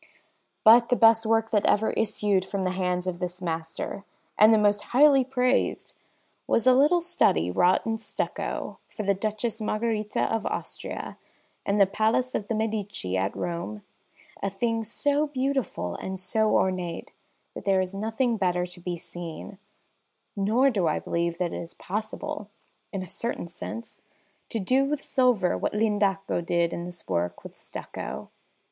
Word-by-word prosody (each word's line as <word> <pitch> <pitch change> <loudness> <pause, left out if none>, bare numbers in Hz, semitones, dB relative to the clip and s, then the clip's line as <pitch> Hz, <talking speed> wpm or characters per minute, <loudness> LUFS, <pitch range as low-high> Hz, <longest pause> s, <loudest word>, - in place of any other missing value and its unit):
But 235 +2 +7
the 245 - +4
best 225 -1 +5
work 225 0 +2
that 210 -2 +3
ever 220 +2 +3
issued 205 -3 +1
from 195 0 -3
the 185 - 0
hands 180 -1 -1
of 180 -2 -3
this 180 0 -4
master, 165 +2 -4 0.3
and 215 +1 +7
the 220 - +6
most 205 -1 +3 0.2
highly 280 -2 +7
praised, 255 0 0 0.5
was 230 - +2
a 255 - +7
little 295 +7 +4
study 90 - +2
wrought 180 - +3
in 225 0 -1
stucco 215 - -4
for 215 - -5
the 200 0 +3
Duchess 215 +3 -3
Margherita 215 0 -1
of 225 -1 0
Austria - - -5 0.5
in 200 +1 +2
the 200 - +7
Palace 220 +6 +1
of 205 - -2
the 225 - -1
Medici 210 - -2
at 95 +1 0
Rome 170 -12 -4 0.6
a 200 - 0
thing 225 +3 -1
so 285 +7 +1
beautiful 265 - -2
and 190 0 -5
so 215 +4 +1
ornate 185 -2 -1 0.4
that - - -8
there 195 -1 +3
is 185 0 -2
nothing 225 +4 0
better 180 -2 +1
to 180 0 -13
be 175 0 -4
seen; 175 +3 -8 0.8
nor 225 +7 +3
do 190 -7 +1
I 155 - +1
believe 170 0 -1
that 175 -2 -1
it - - -4
is 170 - -9
possible, 215 +5 -5 0.4
in 195 -2 -3
a - - -9
certain 235 +3 -3
sense, 175 +7 -8 0.5
to - - -2
do 255 +8 +2
with 285 +1 -2
silver 250 -9 +2
what - - -2
L'Indaco 200 -4 +1
did 170 0 +1
in 170 - -4
this 175 -1 -10
work 85 0 -2
with - - -10
stucco. - - -7
205 Hz, 165 wpm, -26 LUFS, 180-230 Hz, 0.8 s, But